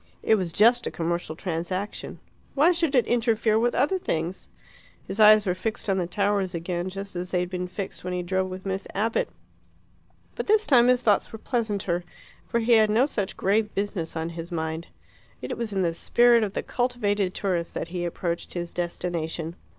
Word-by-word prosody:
It - - +4
was 185 -6 +1
just 235 +6 +4
a - - 0
commercial 170 -1 -3
transaction. 185 +3 -4 0.4
Why 305 +5 +5
should 330 -5 0
it 250 - +4
interfere 225 -2 +2
with 240 +1 +1
other 295 +9 +2
things? 170 - -3 0.6
His 205 - -5
eyes 215 0 +7
were 180 - +1
fixed 215 +4 -4
on 190 - +1
the 175 - -1
towers 200 -1 0
again, 175 +2 -3
just 195 0 -7
as 180 +1 -4
they 180 - +1
had 180 0 -4
been 180 0 -3
fixed 190 +2 -6
when 180 - -3
he 180 0 -2
drove 190 +1 -1
with 185 +1 -8
Miss 195 0 -3
Abbott. 220 +3 0 1.0
But - - -5
this 430 +1 +4
time 245 -4 +5
his 250 0 +3
thoughts 210 -4 +2
were 225 - -7
pleasanter, 205 -7 -1 0.4
for 235 - 0
he 230 +2 0
had 220 -2 +6
no 225 +5 +4
such 205 -9 -3
grave 210 +2 +1
business 195 -5 -2
on 160 0 -2
his 170 +1 -7
mind. 160 0 -3 0.5
It - - -4
was 235 -2 -3
in 195 -2 0
the 170 -1 +1
spirit 235 +6 +4
of 200 -2 -2
the - - -2
cultivated 210 -6 0
tourist 175 -4 -2
that - - -3
he 175 0 -3
approached 170 0 -3
his 175 -1 -4
destination. 170 -1 -3
195 Hz, 195 wpm, -26 LUFS, 175-225 Hz, 1.0 s, eyes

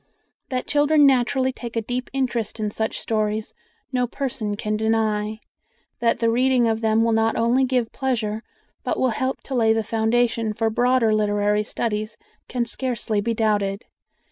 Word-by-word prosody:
That 255 -1 -2
children 295 0 +4
naturally 260 0 +3
take 235 -2 -8
a 230 - +1
deep 250 +3 -3
interest 240 -5 -2
in 210 -1 -1
such 220 +1 -2
stories, 215 -1 -1 0.4
no 250 -1 +1
person 235 -6 -3
can 215 0 -2
deny; 220 -1 0 0.6
that 230 -1 +2
the 230 -1 +2
reading 250 0 +3
of 225 0 0
them 220 0 +3
will 230 - +2
not 225 0 +2
only 240 +3 +3
give 250 -3 0
pleasure, 220 -5 -2 0.4
but - - -1
will 260 - +3
help 260 +4 -2
to 275 - -7
lay 225 -3 +4
the 225 0 0
foundation 225 0 +1
for 225 +1 0
broader 245 -1 +3
literary 210 0 +2
studies, 215 0 -3 0.3
can 245 -1 -1
scarcely 235 -3 -2
be 230 +2 -1
doubted. 205 -2 0
225 Hz, 165 wpm, -23 LUFS, 215-250 Hz, 0.6 s, children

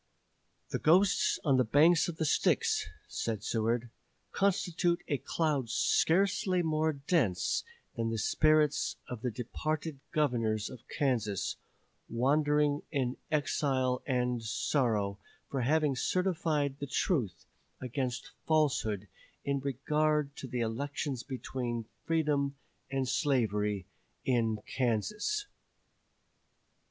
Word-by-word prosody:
"The - - -2
ghosts 185 +5 +4
on 140 -4 +3
the 130 - +4
banks 155 +9 +5
of 170 -2 -5
the 160 - 0
Styx," - - +2 0.2
said 110 -3 -3
Seward, 115 +1 0 0.4
"constitute 175 -3 +1
a 145 - 0
cloud 140 -2 0
scarcely 180 - +2
more 155 0 +1
dense 140 - +1 0.3
than 115 -1 -1
the 115 - -2
spirits 155 +4 +3
of 125 -3 -6
the 125 - 0
departed 150 +5 -3
Governors 115 -8 0
of 125 - -12
Kansas, 115 -8 0 0.5
wandering 145 +4 +2
in 130 -4 0
exile 135 -4 +1
and 125 -2 0
sorrow 110 -4 0 0.3
for 135 - -1
having 150 +2 +2
certified 155 -4 0
the 140 - -4
truth 130 - -1 0.3
against 125 -1 -3 0.2
falsehood 135 -10 +1 0.4
in 140 0 0
regard 145 +2 0
to 135 - -6
the 125 -1 -2
elections 135 +3 -2
between 125 -3 -4 0.2
Freedom 145 -4 +1 0.3
and 135 -1 -1
Slavery 105 - +1 0.4
in 115 -4 +1
Kansas." 205 - -1
135 Hz, 105 wpm, -31 LUFS, 120-155 Hz, 0.5 s, banks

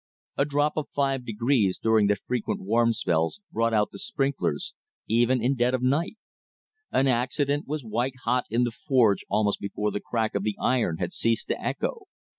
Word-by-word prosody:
A 140 - +2
drop 145 +1 0
of 155 - -2
five 135 -3 0
degrees 115 -3 +1
during 110 -2 +3
the 105 - +3
frequent 120 +3 -3
warm 115 +4 +2
spells 85 - 0
brought 115 +1 +1
out 105 -2 +2
the 100 - -10
sprinklers, 135 - -1 0.3
even 120 +2 +2
in 130 +3 +3
dead 125 0 +2
of 125 - -3
night; 145 - +1 0.8
an 135 - +3
accident 135 +3 0
was 150 0 -3
white 120 +4 -2
hot 125 +2 +1
in 120 +3 +2
the 120 - 0
forge 115 -4 +2
almost 105 -1 +1
before 105 +1 -2
the 105 - -3
crack 110 -2 -1
of 100 - 0
the 105 0 -2
iron 115 -10 +1
had - - -3
ceased 115 0 0
to - - -1
echo. 455 -5 -3
120 Hz, 185 wpm, -26 LUFS, 110-135 Hz, 0.8 s, during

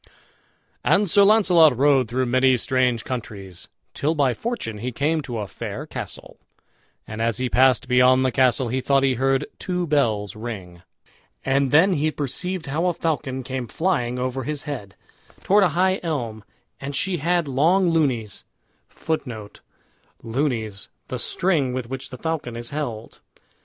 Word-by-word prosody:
And 205 +1 +3
Sir 200 +4 +4
Launcelot 180 - +5
rode 135 -2 +4
through 130 +3 -1
many 130 +1 +3
strange 125 -2 +1
countries, 100 -7 -6 0.3
till 155 +3 0
by 140 -4 +2
fortune 165 - -4
he 125 +4 -3
came 155 +6 0
to 125 -5 -5
a 105 - -3
fair - - -6
castle; - - -8 0.7
and 110 +1 -6
as 115 -1 +1
he 130 0 -1
passed 130 +1 +4
beyond 125 +1 +4
the 130 - +2
castle 130 -1 +2
he 130 +2 -1
thought 135 +1 +2
he 135 -1 +3
heard 135 +2 +1
two 180 -2 -2
bells 115 - 0
ring. 100 -6 -7 0.6
And 135 0 +2
then 165 +7 +5
he 155 -1 +1
perceived 165 +5 -3
how 155 +6 -1
a 175 - 0
falcon 145 -6 -2
came 130 -1 -4
flying 135 -9 -1
over 130 +1 -2
his 150 -1 -4
head, 110 -10 -6 0.5
toward 205 +1 +4
a 180 - +4
high 185 +1 +3
elm; 120 - -3 0.4
and 140 +1 -5
she 185 +2 0
had 170 +1 +1
long 170 +7 +3
lunys 130 -11 0 0.5
[Footnote: 120 -10 -5 0.6
LUNYS, 115 -5 -2 0.2
the - - -4
string 155 -9 0
with 130 -1 -5
which 135 0 -5
the 125 - -8
falcon 160 -7 -3
is 120 0 -6
held. 125 -7 -5
130 Hz, 155 wpm, -23 LUFS, 120-160 Hz, 0.7 s, Launcelot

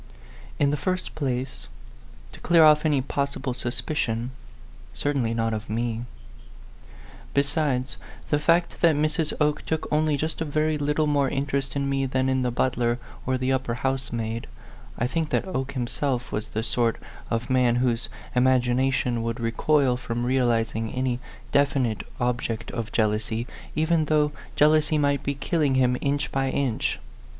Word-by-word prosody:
In 140 -1 +3
the 150 - 0
first 185 0 -1
place 130 - -3 0.6
to - - -13
clear 170 -1 +5
off 150 0 +6
any 145 -3 +2
possible 140 -1 -2
suspicion 120 -1 -2 0.6
certainly 135 - 0
not 115 -1 0
of 110 -1 -5
me. 115 +1 -2 1.3
Besides 140 -2 0 0.3
the 145 - +3
fact 170 +3 +2
that 165 -3 +5
Mrs. 155 +1 0
Oke 150 -1 +1
took 160 -1 -2
only 155 -1 +2
just 155 +3 -3
a - - +3
very 155 0 0
little 150 +2 +1
more 145 -2 +2
interest 135 0 -2
in 140 -1 0
me 135 -1 0
than 130 0 +1
in 130 0 +1
the 125 - +1
butler 120 -1 +1 0.3
or 130 0 +2
the 130 +1 +1
upper 130 -3 -1
housemaid, 120 -3 -2 0.5
I 120 - 0
think 155 +4 -1
that - - +1
Oke 140 -6 -3
himself 125 0 -2
was 105 +1 -3
the 110 - -3
sort 115 -1 +1 0.3
of 115 +3 -2
man 125 -2 +4
whose 120 -1 0 0.3
imagination 125 -1 +2
would 115 +1 -2
recoil 125 +3 +2
from 120 -1 -3
realizing 115 -3 +1
any 130 -1 -1 0.3
definite 135 -6 +2 0.2
object 120 -2 -1
of 115 -2 -4
jealousy, 110 +1 0 0.3
even 160 +1 +2
though 150 -1 +2 0.2
jealousy 155 +1 +4
might 140 -2 +2
be 140 0 -2
killing 145 -1 +1
him 125 -1 +3
inch 140 +1 0
by 135 0 0
inch. 130 -4 0
130 Hz, 150 wpm, -25 LUFS, 120-145 Hz, 1.3 s, off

